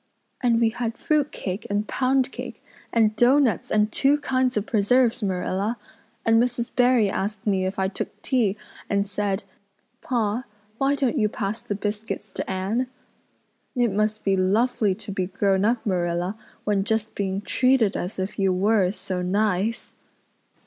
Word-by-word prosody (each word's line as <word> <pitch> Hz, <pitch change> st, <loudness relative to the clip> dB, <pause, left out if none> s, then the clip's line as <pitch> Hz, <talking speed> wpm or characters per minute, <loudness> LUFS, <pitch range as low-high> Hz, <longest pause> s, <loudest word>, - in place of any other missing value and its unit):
And 235 Hz, -3 st, +3 dB
we 230 Hz, -1 st, +4 dB
had 230 Hz, 0 st, -3 dB
fruit 300 Hz, -2 st, +1 dB
cake 190 Hz, +4 st, -5 dB
and 205 Hz, +1 st, -1 dB
pound 265 Hz, 0 st, +1 dB
cake -, -, -8 dB, 0.3 s
and 220 Hz, -2 st, +3 dB
doughnuts 245 Hz, -, +3 dB
and 210 Hz, 0 st, +2 dB
two 280 Hz, +5 st, +3 dB
kinds 260 Hz, -4 st, 0 dB
of 210 Hz, -, 0 dB
preserves, 235 Hz, +3 st, +2 dB
Marilla. 195 Hz, +3 st, -1 dB, 0.5 s
And 225 Hz, 0 st, +5 dB
Mrs. 240 Hz, -1 st, -1 dB
Barry 245 Hz, -3 st, +4 dB
asked 200 Hz, +1 st, -3 dB
me 190 Hz, -3 st, +1 dB
if 190 Hz, +2 st, -4 dB
I 190 Hz, 0 st, +1 dB
took 190 Hz, -, -5 dB
tea 220 Hz, -6 st, +1 dB, 0.3 s
and 200 Hz, -1 st, +1 dB
said 205 Hz, 0 st, -2 dB, 0.6 s
'Pa, 235 Hz, -1 st, -1 dB, 0.3 s
why 275 Hz, +1 st, +2 dB
don't 275 Hz, -1 st, 0 dB
you 210 Hz, -1 st, +2 dB
pass 210 Hz, +2 st, -3 dB
the 235 Hz, -4 st, -3 dB
biscuits 210 Hz, 0 st, -4 dB
to -, -, -4 dB
Anne?' 195 Hz, +7 st, -1 dB, 0.9 s
It 240 Hz, -3 st, +2 dB
must 215 Hz, +2 st, 0 dB
be 195 Hz, -1 st, +2 dB
lovely 205 Hz, +2 st, +2 dB
to 200 Hz, -, -7 dB
be 185 Hz, -2 st, -1 dB
grown 195 Hz, 0 st, +1 dB
up, 230 Hz, +1 st, +1 dB
Marilla, 175 Hz, 0 st, 0 dB, 0.3 s
when 205 Hz, -2 st, +1 dB
just 220 Hz, +1 st, -1 dB
being 195 Hz, -1 st, -2 dB
treated 250 Hz, 0 st, +2 dB
as 180 Hz, +4 st, -4 dB
if 190 Hz, +3 st, -4 dB
you 195 Hz, -1 st, +3 dB
were 200 Hz, +2 st, +3 dB
is 185 Hz, +3 st, -2 dB
so 185 Hz, -1 st, -2 dB
nice." 205 Hz, +3 st, 0 dB
215 Hz, 165 wpm, -24 LUFS, 195-240 Hz, 0.9 s, And